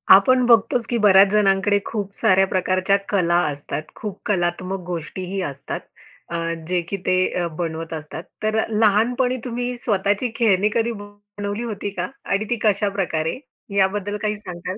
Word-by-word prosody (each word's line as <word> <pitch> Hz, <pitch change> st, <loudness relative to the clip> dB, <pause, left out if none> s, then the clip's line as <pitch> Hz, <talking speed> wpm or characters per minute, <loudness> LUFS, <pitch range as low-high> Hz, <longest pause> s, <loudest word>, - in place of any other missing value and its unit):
आपण 255 Hz, +6 st, +4 dB
बघतोच 230 Hz, 0 st, +4 dB
की 240 Hz, -, +1 dB
बऱ्याच 195 Hz, -1 st, +7 dB
जणांकडे 205 Hz, -1 st, +3 dB
खूप 200 Hz, -3 st, -4 dB
साऱ्या 190 Hz, 0 st, +4 dB
प्रकारच्या 185 Hz, +1 st, +1 dB
कला 175 Hz, -4 st, +2 dB
असतात. 145 Hz, +1 st, -4 dB
खूप 205 Hz, -3 st, -6 dB
कलात्मक 185 Hz, 0 st, -1 dB
गोष्टीही 180 Hz, +3 st, -4 dB
असतात 140 Hz, -4 st, -5 dB, 0.5 s
अ, 170 Hz, -, -2 dB, 0.3 s
जे 180 Hz, 0 st, +1 dB
की 200 Hz, -, -3 dB
ते -, -, +2 dB, 0.3 s
अ 175 Hz, -, 0 dB
बनवत 165 Hz, -1 st, -4 dB
असतात. 155 Hz, +1 st, -6 dB, 0.2 s
तर 215 Hz, 0 st, +1 dB
अ, -, -, +2 dB
लहानपणी 225 Hz, +4 st, +2 dB
तुम्ही 245 Hz, 0 st, -3 dB
स्वतःची 205 Hz, -1 st, 0 dB
खेळणी 210 Hz, -4 st, +3 dB
कधी 235 Hz, 0 st, +1 dB
बनवली 205 Hz, +1 st, -6 dB
होती 210 Hz, -3 st, -4 dB
का? 200 Hz, -, -3 dB, 0.2 s
आणि 200 Hz, +2 st, 0 dB
ती 240 Hz, -, +2 dB
कशाप्रकारे 195 Hz, -6 st, 0 dB, 0.4 s
याबद्दल 205 Hz, +1 st, +1 dB
काही 215 Hz, 0 st, 0 dB
सांगाल? 185 Hz, -2 st, -7 dB
200 Hz, 150 wpm, -22 LUFS, 185-215 Hz, 0.5 s, बऱ्याच